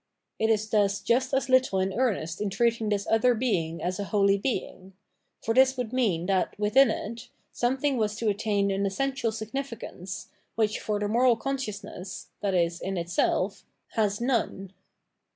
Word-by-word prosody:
It 220 - +2
is 215 -1 +2
thus 205 -2 +2
jxist 245 +3 +1
as 270 0 +1
little 255 -7 +3
in 190 0 0
earnest 195 -8 -1
in 210 - 0
treating 230 +1 +1
this 205 -1 0
other 230 +2 +3
being 180 -9 -1
as 185 +3 -2
a 200 - -2
holy 200 -1 +3
being; 195 -5 -4 0.5
for 225 - 0
this 265 +1 +5
would 245 -2 -3
mean 200 -10 +1
that, 190 -1 0
within 230 +6 +5
it, 230 +3 -5 0.2
something 265 +3 0
was 215 -2 0
to 230 0 -2
attain 200 -1 +1
an 195 +1 0
essential 260 +3 -1
significance, 220 -4 -6 0.3
which, 215 -1 +1
for 210 -1 -1
the 205 - -1
moral 240 +3 +4
consciousness, 210 -8 -5
i.e. 180 -4 +2
in 195 0 -3
itself, 175 +3 0 0.3
has 210 -2 0
none. 230 -6 -1
215 Hz, 160 wpm, -27 LUFS, 195-245 Hz, 0.5 s, this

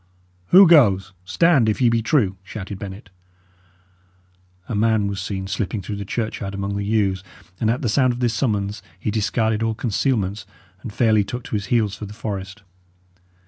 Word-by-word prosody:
"Who 190 +1 +8
goes? 100 - +4
Stand! 140 - +3
if 105 - -1
ye 125 - +4
be 115 -1 +2
true!" 110 - +1
shouted 100 0 -8
Bennet. 95 0 -9 1.6
A - - -4
man 110 0 +2
was 100 -1 -3
seen 95 -1 -4
slipping 100 +2 -3
through 105 +2 -5
the 100 - -5
churchyard 100 -2 -4
among 100 0 -3
the 100 - -2
yews; 100 -3 0 0.4
and 110 - +1
at 125 +5 -1
the - - +1
sound 130 +3 +3
of 120 - -5
this 120 -2 +1
summons 105 -4 -1 0.2
he 105 - -2
discarded 110 +1 0
all 115 -1 0
concealment, 110 -3 -1 0.4
and 110 - -7
fairly 110 -1 +3
took 120 +5 -6
to 125 - -5
his 100 -1 -3
heels 110 -3 +1
for 105 - -7
the 105 - -11
forest. 100 -1 -6
105 Hz, 180 wpm, -21 LUFS, 100-115 Hz, 1.6 s, Who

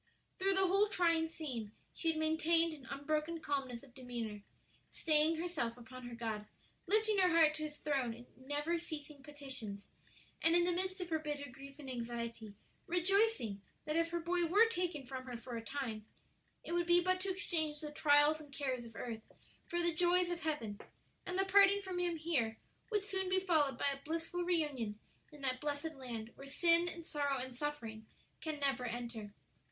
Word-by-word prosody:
Through 385 +1 +3
the 385 0 +4
whole 395 +3 +4
trying 335 -5 +3
scene 255 -10 -5 0.2
she 330 - -4
had 320 - +1
maintained 320 +1 +3
an 285 -4 -11
unbroken 305 +4 -1
calmness 270 -5 -2
of 265 -3 -16
demeanor, 235 -5 -5 0.5
staying 310 0 +3
herself 315 -9 -2
upon 250 +1 -9
her 240 - -7
God, 220 -2 -3 0.4
lifting 430 +1 +3
her 365 -1 +5
heart 325 -3 +6
to 310 - -4
His 300 -1 -7
throne 275 -6 0
in 240 +1 -12
never 290 +6 -1
ceasing 300 -4 -7
petitions, 265 -8 -6 0.5
and 330 +1 +5
in 350 - +5
the 355 - +3
midst 375 +2 -1
of 355 - -4
her 320 - +2
bitter 295 -2 -4
grief 275 +1 -11
and 290 -3 -9
anxiety 235 -3 -4 0.3
rejoicing 355 - +2 0.2
that 305 0 -1
if 335 0 +2
her 340 +1 -1
boy 345 +1 +1
were 410 +7 +7
taken 350 -9 -2
from 255 0 -6
her 250 -2 -5
for 240 +1 -7
a 230 - -4
time, 225 -5 -4 0.6
it - - -7
would 345 0 +1
be 345 0 +7
but 370 +1 +2
to 385 +1 -1
exchange 320 -5 0
the 300 -1 -4
trials 295 +1 +5
and 295 -2 -13
cares 265 -3 -2
of 230 - -12
earth 230 -2 -4 0.5
for 345 0 -1
the 340 -1 +2
joys 350 +2 +3
of 345 -1 -3
heaven; 230 -10 -2 0.5
and 365 - -2
the 385 - +3
parting 395 +1 +7
from 370 -2 -3
him 350 -1 +1
here 285 -9 0 0.3
would 415 -3 +1
soon 380 -2 -1
be 375 0 +3
followed 315 -7 +2
by 280 - +2
a 275 - -10
blissful 330 +3 -2
reunion 295 -12 0 0.3
in 295 -1 -13
that 255 -2 0
blessed 295 +2 -2
land 235 -5 -6
where 275 - -11
sin 335 +4 +4
and 335 -1 -8
sorrow 285 -4 0
and 255 -1 -5
suffering 235 -6 -4 0.3
can 310 -2 -3
never 270 -3 +1
enter. 230 -3 -5
300 Hz, 190 wpm, -36 LUFS, 255-345 Hz, 0.6 s, were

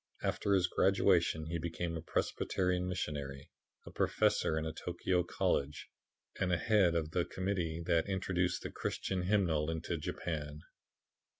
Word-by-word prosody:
After 100 - +1
his 90 -2 +3
graduation 90 -4 +3
he 85 +1 -3
became 85 +1 -3
a 80 - -4
Presbyterian 90 +2 0
missionary, 70 -6 -4 0.3
a - - -9
professor 80 - +2
in 80 - -1
a 80 - -3
Tokio 90 +2 0
college 75 -4 -1 0.5
and 95 - +1
the 90 - +3
head 95 -4 +3
of 80 -2 -1
the 90 +1 +1
Committee 90 -4 -2
that 85 +4 +2
introduced 90 -2 0
the - - -5
Christian 95 -1 -2
hymnal 90 -5 +2
into 80 +1 -2
Japan. 75 -1 -4
85 Hz, 140 wpm, -34 LUFS, 80-90 Hz, 0.5 s, his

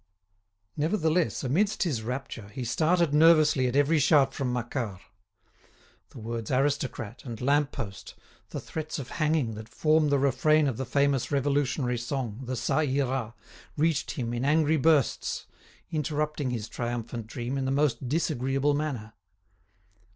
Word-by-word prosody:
Nevertheless, 160 0 +1
amidst 195 +13 +1
his 145 -11 -1
rapture, 120 -3 -5
he 125 +5 -6
started 160 +6 +2
nervously 155 -4 +5
at 125 - -2
every 145 +3 +3
shout 140 -2 +4
from 130 -3 -2
Macquart. 120 -5 -3 1.1
The - - -14
words 115 -1 -5
aristocrat 130 -4 -1
and 115 -4 -7
lamp 145 +2 +2
post, 100 -7 -7 0.3
the - - -5
threats 155 -1 -5
of 135 -3 -6
hanging 150 -7 +1
that 110 +1 -9
form 155 -1 +2
the 140 - +3
refrain 140 +3 +3
of 125 -5 -2
the 130 - -4
famous 140 0 +1
revolutionary 140 -3 0
song, 120 -2 -4
the 130 +1 -3
"Ca 125 - 0
Ira," 130 -5 -1 0.4
reached 150 -1 +1
him 120 -4 -3
in 120 +1 -2
angry 155 +2 +3
bursts, 150 -3 +1 0.5
interrupting 150 -2 -1
his 115 -3 -3
triumphant 120 -1 -4
dream 120 +2 -4
in 135 -1 -1
the - - 0
most 135 -3 0
disagreeable 140 -2 +1
manner. 135 -8 -3
135 Hz, 145 wpm, -28 LUFS, 120-150 Hz, 1.1 s, nervously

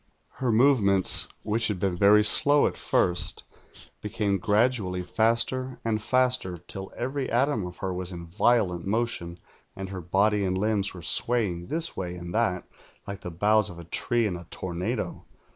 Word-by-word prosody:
"Her 130 -3 0
movements, 110 -6 +3 0.2
v^hich 110 +2 0
had 105 -4 -3
been 95 -1 0
very 105 +3 +5
slow 145 +7 +3
at - - -1
first, 90 +1 0 0.6
became 105 -2 -1
gradually 105 -3 +1
faster 115 +6 0
and 110 -1 0
faster, 125 -6 +1
till 95 +3 -8
every 130 +2 -3
atom 120 -5 +1
of 90 -1 -10
her 95 -1 -3
was 90 0 -4
in 85 -1 -7
violent 95 -1 +1
motion, 100 -5 -2 0.4
and 95 0 -6
her 95 -1 -6
body 100 +4 +2
and 95 -1 0
limbs 100 -1 0
were 85 - -10
swaying 95 -9 0
this 165 +1 -1
way 90 -1 -4
and 85 0 -7
that, 105 -6 0 0.4
like 100 0 -7
the - - -6
boughs 105 +4 +2
of 90 - -10
a 85 - -9
tree 115 +7 0
in 100 -4 -1
a 85 -1 -10
tornado. 95 +6 -4
100 Hz, 165 wpm, -26 LUFS, 90-115 Hz, 0.6 s, very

